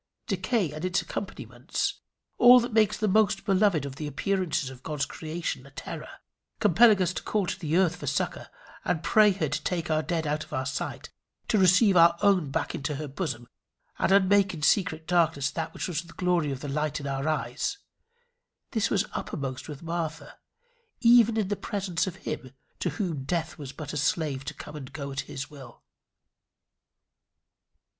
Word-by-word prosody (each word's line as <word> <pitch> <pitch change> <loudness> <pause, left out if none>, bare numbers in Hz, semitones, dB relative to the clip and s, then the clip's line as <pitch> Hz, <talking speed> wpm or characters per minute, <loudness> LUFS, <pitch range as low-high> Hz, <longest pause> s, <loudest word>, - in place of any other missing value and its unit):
Decay 195 - 0
and 155 +2 -7
its 185 +1 +1
accompaniments, 195 -1 -4 0.4
all 245 +1 +9
that 240 -1 -3
makes 215 -2 +3
the 215 - 0
most 210 0 +2
beloved 195 -6 +3
of 140 -1 -7
the 150 - -4
appearances 160 -2 -1
of 130 -1 -12
God's 150 -1 -2
creation 160 -4 -4
a - - -13
terror, 135 - -7 0.5
compelling 210 +1 +6
us 180 0 -1
to - - -4
call 210 -3 0
to - - -4
the 160 0 0
earth 180 -2 +3
for - - -7
succour, - - -2 0.3
and 170 -3 -1
pray 215 -1 +5
her 185 -5 -1
to 145 +2 -2
take 175 -2 -2
our 155 0 +2
dead 165 0 -2
out 150 +1 -1
of - - -14
our 130 0 -1
sight, 135 +1 -4 0.4
to 215 - +3
receive 190 +3 +6
her 170 -1 +6
own 185 -7 +4
back 135 - -2
into 145 +1 -3
her 150 +2 -5
bosom, 135 -5 -4 0.5
and - - +2
unmake 195 -1 +4
in 150 - -8
secret 160 -3 +2
darkness 160 -5 +2
that 165 -1 -3
which - - -4
was 170 -3 -2
the 170 -1 -14
glory 175 -5 +1
of 135 -1 -5
the 145 - -5
light 150 +2 -1
in 140 - -7
our 135 +1 -2
eyes 150 - -1 0.9
this 225 -2 +1
was 200 0 +1
upper - - -4
most 135 -3 -5
with 145 +1 -8
Martha, 165 -1 -4 0.6
even 235 -2 +6
in 210 -3 +1
the 205 - -1
presence 190 -4 -2
of 185 - -4
him 130 0 -5 0.2
to - - 0
whom 170 -10 -3
Death 165 +3 -2
was 140 -3 -6
but 155 0 -7
a - - -2
slave 145 -1 0
to - - -5
come 150 - -9
and 135 -3 -8
go 140 -3 -5
at 135 - -4
his 140 +2 -6
will. 135 -5 -13
165 Hz, 190 wpm, -27 LUFS, 145-195 Hz, 0.9 s, all